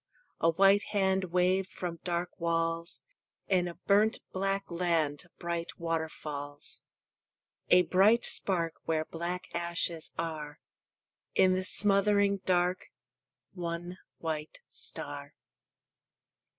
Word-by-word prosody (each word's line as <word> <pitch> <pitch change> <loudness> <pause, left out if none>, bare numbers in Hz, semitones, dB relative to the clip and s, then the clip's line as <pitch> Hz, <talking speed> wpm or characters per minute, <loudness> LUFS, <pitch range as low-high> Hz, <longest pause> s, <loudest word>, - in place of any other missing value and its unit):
A 165 - +4
white 195 +4 +5 0.2
hand 190 -1 +2
Waved 185 +2 +2
from 170 -2 -5
dark 175 0 -2
walls; 165 0 -1 0.4
In 180 -2 +2
a 170 - -6
burnt 210 +3 +3
black 195 +1 0
land 165 -4 0
Bright 170 -1 -4
waterfalls. 155 -3 -4 0.9
A 180 0 +7
bright 205 +7 +5
spark 170 -4 -1
Where 155 -1 0
black 175 +3 -4
ashes 170 -1 0
are; 155 -3 -4 0.8
In 185 0 +5
the 185 0 0
smothering 200 +1 +3
dark 180 0 +1 0.7
One 175 0 -5 0.2
white 155 - -4
star. - - -6
175 Hz, 100 wpm, -31 LUFS, 165-190 Hz, 0.9 s, A